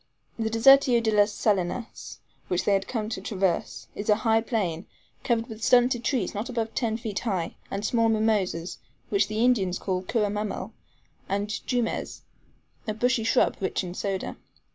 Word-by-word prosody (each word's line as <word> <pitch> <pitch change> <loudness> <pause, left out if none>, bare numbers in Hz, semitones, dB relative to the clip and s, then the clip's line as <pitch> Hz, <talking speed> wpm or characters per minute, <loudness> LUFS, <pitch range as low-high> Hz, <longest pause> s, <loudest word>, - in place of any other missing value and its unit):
The 220 -1 0
Desertio 245 +2 +6
de 225 -1 0
las 210 0 +4
Salinas, 205 +3 -2 0.3
which 180 - -1
they 205 - +3
had 195 0 +1
to 220 -4 -3
traverse, 190 -3 -1
is 205 - -5
a 210 - +6
dry 225 +1 +2
plain, 195 -8 -2 0.4
covered 230 -2 +1
with 220 -2 -9
stunted 245 -1 +4
trees 235 -7 0
not 210 +5 -4
above 230 -2 -2
ten 225 -3 -1
feet 220 -4 -4
high, 190 -8 -2 0.2
and 200 +2 -3
small 230 -1 +2
mimosas, 210 -6 0 0.3
which 200 0 +2
the 215 +2 +1
Indians 195 -8 +2
call 185 -2 -2
curra 205 +2 0
mammel; 210 0 -4 0.6
and 200 +1 -1 0.2
JUMES, 245 -3 -2 0.6
a 215 - -2
bushy 245 0 +1
shrub, 225 - +2
rich 190 0 -1
in 175 -1 -6
soda. 195 0 -3
215 Hz, 165 wpm, -26 LUFS, 195-230 Hz, 0.6 s, Desertio